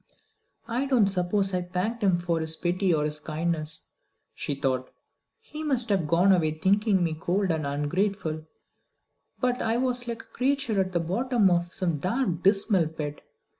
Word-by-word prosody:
"I 245 +4 -1
don't 250 -6 +4
suppose 195 +1 +1
I 180 - +1
thanked 185 +6 -3
him 190 -4 +3
for 175 -1 -1
his 160 0 -2
pity 180 +3 0
or 150 -2 +2
his 150 0 -3
kindness," 155 0 -3 0.5
she 145 - -3
thought. 130 -2 -1 0.5
"He 305 - -9
must 255 -6 0
have 190 -6 +1
gone 175 +5 +4
away 155 -4 +2
thinking 195 +2 +2
me 165 -2 0
cold 180 +4 0
and 155 -3 -1
ungrateful; 155 +2 -1 1.0
but 250 -1 +1
I 225 +1 +1
was 250 -1 +1
like 230 -1 -4
a - - -25
creature 260 -5 0
at 185 -1 -3
the 175 - +2
bottom 210 +4 +2
of 175 0 +1
some 175 -7 -1
dark 185 - -1
dismal 195 -3 +3
pit. 150 -2 -6
185 Hz, 170 wpm, -27 LUFS, 160-220 Hz, 1.0 s, don't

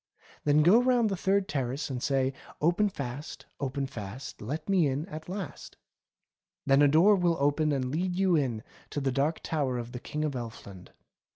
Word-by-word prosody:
Then 150 +1 +5
go 200 +9 +6
round 245 -3 +3
the - - 0
third 195 +1 +1
terrace 135 0 -2
and 125 -2 -3
say: 135 -1 +1 0.3
'Open 175 +7 +2
fast, 140 -4 -6
open 135 0 -2
fast. 120 -1 -8
Let 140 +10 -4
me 185 -6 +3
in 140 +3 -2
at 160 -2 -8
last.' 190 -4 -6 0.9
Then 135 +1 +5
a 145 - +7
door 170 +9 +6
will 175 -3 +2
open 145 +2 +2
and 130 -3 -1
let 175 +5 0
you 185 -1 +3
in 125 -7 0 0.3
to - - -3
the 135 -1 0
Dark 140 +5 0
Tower 140 -6 -1
of 120 0 -5
the 125 - -6
King 150 +4 -3
of 150 - -1
Elfland. 110 -6 -8
145 Hz, 185 wpm, -29 LUFS, 130-175 Hz, 0.9 s, a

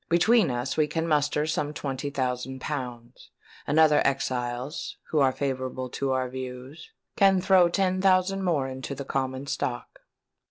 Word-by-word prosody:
Between 180 +3 +4
us 125 +2 -2
we 155 -1 +3
can 160 +2 -2
muster 150 -1 +1
some 150 -1 -2
twenty 140 0 -3
thousand 130 -1 -3
pounds; 125 -4 -6 0.4
and 150 +3 +2
other 155 -2 +6
exiles, 125 +1 -2
who 155 - +2
are 135 -2 +4
favourable 130 -2 -3
to 135 -1 -2
our 130 -1 0
views, 130 - -8 0.3
can 195 -2 +5
throw 185 -1 +5
ten 185 +1 0
thousand 190 0 +3
more 155 -7 +1
into 130 +1 -6
the 140 - -6
common 130 0 -2
stock." 120 -3 -4
140 Hz, 155 wpm, -26 LUFS, 130-160 Hz, 0.4 s, other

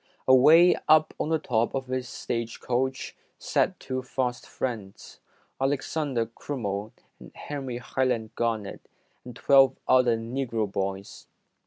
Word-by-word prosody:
Away 155 +7 +7
up 155 0 +5
on - - -1
the 160 - +2
top 115 -5 -1
of 135 -1 -2
this 130 -1 -4
stage 115 -1 -4
coach, 130 +2 -2 0.2
sat - - 0
two 130 0 -4
fast 125 -1 -3
friends, 110 -7 -6 0.4
Alexander 135 -2 -1
Crummell 110 -4 -5 0.3
and - - -13
Henry 135 -4 -5
Highland 120 -3 -2
Garnet, 110 -4 -2 0.4
and 125 -1 -10
twelve 135 0 +4
other 125 -3 +4
Negro 115 -3 -3
boys. 100 0 -4
125 Hz, 125 wpm, -26 LUFS, 115-135 Hz, 0.4 s, Away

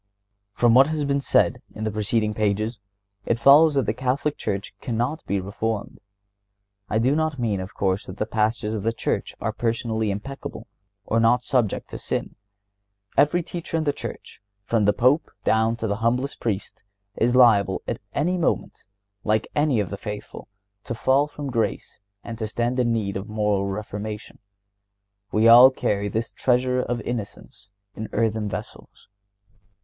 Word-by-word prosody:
From 120 -1 +4
what 135 +3 +7
has 155 -2 -1
been 140 0 0
said - - +2
in 110 - -5
the 110 - -1
preceding 105 +1 0
pages, 110 +2 -1 0.4
it 115 - 0
follows 145 +5 +6
that 135 -4 +2
the 105 - 0
Catholic 130 +5 -1
Church 100 -1 -4
cannot 120 +6 -2
be 100 - 0
reformed. 105 +3 -4 0.9
I 110 - +1
do 130 +6 +2
not 155 -2 0
mean, 110 -5 -1
of 95 +2 -7
course, 95 0 -1
that 95 - -8
the 110 - -1
Pastors 110 0 0
of 110 - -2
the 115 +3 0
Church - - -2
are - - -1
personally 110 -2 -1
impeccable 105 +8 -6 0.4
or 115 - +1
not 120 +2 +3
subject 120 -6 0
to - - -6
sin. - - -3 0.8
Every 150 +5 +3
teacher 170 -1 -4
in 160 - 0
the 145 -2 +1
Church, - - -8 0.2
from 110 0 +1
the 105 - +5
Pope 130 +9 +2
down 110 +2 +2
to 115 - -4
the 100 -2 -1
humblest 125 +5 -1
Priest, 100 -4 -3 0.3
is 120 +2 +1
liable 105 -6 +5
at - - -3
any 180 +5 0
moment, 170 - -1 0.4
like 110 0 +1
any 145 -5 +2
of 100 -3 -2
the 100 - -4
faithful, 105 0 -7 0.4
to 120 - -4
fall 135 +5 +2
from 145 -2 -6
grace 115 -2 -2 0.2
and 115 -1 -7
to 110 - -2
stand 120 +3 -1
in 120 -2 +2
need 100 -4 -1
of 100 +3 -7
moral 105 -2 0
reformation. 105 +1 -6 0.9
We 110 +2 +4
all 120 +3 +10
carry 100 -6 -1
"this 110 +3 -3
treasure 125 0 +1
(of 120 -1 -2
innocence) 110 -2 -6 0.2
in 110 - -6
earthen 110 -1 0
vessels." - - -8
115 Hz, 165 wpm, -24 LUFS, 105-130 Hz, 0.9 s, all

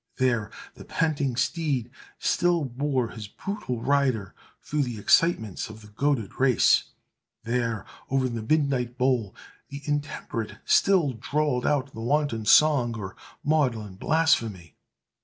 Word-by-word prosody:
There 120 -5 +1 0.2
the - - -12
panting 145 -6 -1
steed 130 -2 -1 0.3
still 175 -3 +1
bore 130 -1 -1
his 110 -3 -8
brutal 125 - -5
rider 130 -9 +1 0.3
through 150 0 -2
the 120 -5 -3
excitements 110 - +2
of 110 0 -11
the 105 - -14
goaded 120 -1 -1
race! 130 -7 +4 0.6
There, 115 -2 -1 0.2
over 135 -1 +1
the 115 -2 -4
midnight 130 -1 0
bowl, 125 -6 +1 0.3
the 140 +1 -8
intemperate 145 -6 -3
still 175 -9 +3
drawled 140 +2 -1
out 140 -2 0
the 115 - -7
wanton 130 -3 0
song 125 -5 +5
or 95 -3 -7 0.3
maudlin 125 -10 0
blasphemy! 110 - 0
130 Hz, 125 wpm, -26 LUFS, 115-145 Hz, 0.6 s, song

